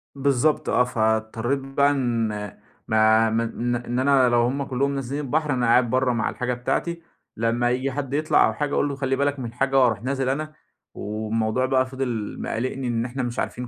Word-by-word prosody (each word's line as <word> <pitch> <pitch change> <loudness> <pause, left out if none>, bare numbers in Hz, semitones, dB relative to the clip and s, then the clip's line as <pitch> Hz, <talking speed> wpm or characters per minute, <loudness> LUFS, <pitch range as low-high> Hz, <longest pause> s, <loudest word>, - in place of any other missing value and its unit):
بالضبط 140 +2 +1
آه. 125 - +4
فاضطريت 110 +3 0
بقى 140 +1 +1
إن 120 -5 0 0.6
ما 110 0 +4
من 115 +2 -1
إن 120 +1 -3
أنا 130 -2 +4
لو 120 0 +3
هم 135 +4 0
كُلّهم 140 +1 -1
نازلين 135 +2 -3
البحر 150 +1 0
أنا 125 -1 0
قاعد 120 +1 +4
برّه 130 0 +1
مع 110 -1 0
الحاجة 125 0 -2
بتاعتي 170 +7 -2 0.4
لمّا 115 +2 +1
ييجي 130 +2 -1
حد 135 -1 -4
يطلع 155 +2 +3
أو - - -2
حاجة 145 -1 -2
أقول 145 - +1
له 140 - -4
خلِّ 135 -1 -1
بالك 140 0 0
من 125 - -4
الحاجة 135 +3 +1
وأروح 115 -3 +2
نازل 135 0 -1
أنا. 155 +3 -3 0.4
والموضوع 110 +3 -1
بقى 130 -1 +2
فِضل 130 -5 -4
مقلّقني 130 +2 -3
إن 115 0 -1
إحنا 130 +1 -4
مش 120 0 -3
عارفين 125 0 -3
125 Hz, 190 wpm, -24 LUFS, 115-135 Hz, 0.6 s, آه